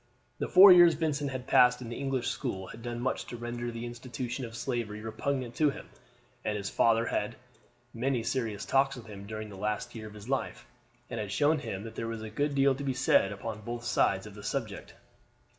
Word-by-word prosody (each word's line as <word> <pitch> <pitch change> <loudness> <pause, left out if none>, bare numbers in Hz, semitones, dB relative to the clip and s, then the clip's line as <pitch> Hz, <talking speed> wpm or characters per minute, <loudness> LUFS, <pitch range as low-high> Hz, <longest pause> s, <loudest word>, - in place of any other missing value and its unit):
The - - -1
four 190 +2 +10
years 175 -2 +8
Vincent 145 -3 -1
had 130 -2 -5
passed 125 -1 +5
in 120 -2 -7
the 120 - -5
English 135 -3 -1
school 100 -9 -3
had 115 - -10
done 120 0 -4
much 130 - -1
to 120 - -6
render 120 0 -4
the 115 0 -5
institution 120 +1 -5
of 115 0 -9
slavery 120 -5 -3
repugnant 120 +3 -3
to 150 -2 +4
him, 135 - -8 0.5
and 105 -1 -1
his 100 0 -4
father 115 0 +3
had - - +1
had 105 - -5 0.6
many 125 0 0
serious 110 -5 -2
talks 135 0 +2
with 120 -3 -10
him 100 -2 -10
during 110 0 -6
the 100 - -10
last 105 +4 -2
year 110 -2 -7
of 105 - -12
his 105 +1 -11
life, 135 0 -2 0.4
and - - -5
had 105 -2 -4
shown 150 +6 +3
him 100 -8 -5
that 110 0 -8
there 115 - -4
was 115 -1 -5
a 110 - -7
good 145 +5 -1
deal 135 0 +4
to 140 +2 -6
be 135 -2 -1
said 130 -6 +3
upon 110 +2 -6
both 120 +2 -5
sides - - +1
of - - -10
the - - -10
subject. - - -4
120 Hz, 225 wpm, -30 LUFS, 110-135 Hz, 0.6 s, four